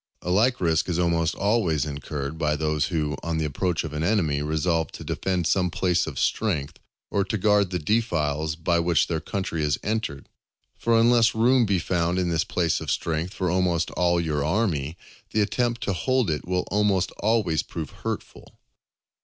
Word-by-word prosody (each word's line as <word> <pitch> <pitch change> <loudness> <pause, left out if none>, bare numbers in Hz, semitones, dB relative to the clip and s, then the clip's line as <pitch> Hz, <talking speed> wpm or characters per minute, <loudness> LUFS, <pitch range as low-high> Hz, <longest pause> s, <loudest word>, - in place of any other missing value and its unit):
A 90 - -2
like 120 +6 +3
risk 85 0 +1
is 85 - 0
almost 85 -2 +1
always 100 -8 +1
incurred 75 +1 -5
by 75 -2 +1
those 75 -1 0
who, 75 -4 -1
on 85 -1 -2
the 80 - 0
approach 85 +3 -1
of 80 -2 -6
an 75 - -3
enemy, 80 -6 +1
resolve 80 +2 0
to - - -8
defend 90 -3 -1
some 90 0 +2
place 90 0 +1
of 70 -5 -6
strength, 80 - -1 0.3
or 100 - +2
to 105 +2 -2
guard 105 -1 +3
the 90 - -1
defiles 80 -6 0
by 85 +1 +1
which 85 -2 +2
their 80 -2 -2
country 85 -1 -3
is 75 -2 +1
entered. 105 -10 -3 0.5
For 115 -1 +2
unless 120 0 +4
room 120 +1 +4
be 100 -1 +2
found 85 0 0
in 90 -1 0
this 80 -2 +1
place 85 -3 0
of - - -5
strength 85 +3 -2
for 90 -3 -1
almost 90 -2 +1
all 85 -1 +2
your 75 -4 -1
army, 80 -3 0 0.4
the 110 - +3
attempt 120 +2 0
to 100 - 0
hold 125 +2 +1
it 75 - -3
will 90 0 0
almost 100 -2 +2
always 105 -7 +2
prove 80 -4 -6
hurtful. - - -6
85 Hz, 185 wpm, -25 LUFS, 80-100 Hz, 0.5 s, unless